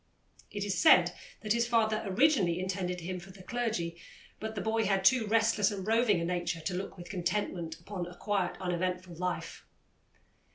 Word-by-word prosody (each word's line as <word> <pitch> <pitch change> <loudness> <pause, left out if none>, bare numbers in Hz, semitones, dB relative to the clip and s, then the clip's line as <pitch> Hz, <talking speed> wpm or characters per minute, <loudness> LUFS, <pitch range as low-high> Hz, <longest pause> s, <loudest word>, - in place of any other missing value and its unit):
It 205 -1 -4
is 190 -3 -1
said 175 -1 +6 0.3
that 215 0 +1
his 235 0 +1
father 220 -2 +2
originally 195 - +3
intended 180 -1 -2
him 180 +2 -4
for 185 +2 -13
the 190 0 -13
clergy, 185 -8 -2 0.4
but 220 0 -5
the - - -2
boy 225 0 +1
had 195 -1 +1
too 240 -1 +5
restless 220 -2 +3
and 195 -3 -5
roving 220 -3 +3
a 170 - -1
nature 175 -1 -1
to 170 +4 -3
look 190 +2 -5
with 175 - -9
contentment 175 -3 -2
upon 180 0 -5
a 175 - -11
quiet, 200 -4 -1
uneventful 180 0 -2
life. 180 +2 -4
190 Hz, 175 wpm, -31 LUFS, 180-215 Hz, 0.4 s, said